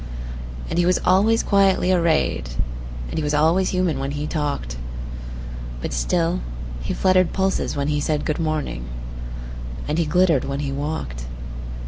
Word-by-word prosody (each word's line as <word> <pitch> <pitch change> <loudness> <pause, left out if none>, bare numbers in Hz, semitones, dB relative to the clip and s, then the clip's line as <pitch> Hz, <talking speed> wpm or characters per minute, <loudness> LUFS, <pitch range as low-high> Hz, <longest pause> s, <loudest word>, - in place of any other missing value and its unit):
And 170 - 0
he 175 - +4
was 180 - +5
always 210 +5 +5
quietly 195 -2 +4
arrayed, 160 - +2 0.6
And - - -2
he - - -1
was 150 0 +1
always 165 +5 +4
human 180 -5 +1
when 135 +1 -2
he 145 0 -2
talked; 145 - -2 1.0
But - - -3
still 165 - +1 0.4
he - - -2
fluttered 185 -2 +3
pulses 190 0 +1
when 140 0 0
he 150 -1 +2
said,"Good 150 +1 0
morning," 155 - -1 1.0
and 155 +3 +1
he 170 - +3
glittered 170 -4 +4
when 140 +1 -2
he 140 -2 -1
walked. 135 - -3
155 Hz, 145 wpm, -23 LUFS, 145-185 Hz, 1.0 s, was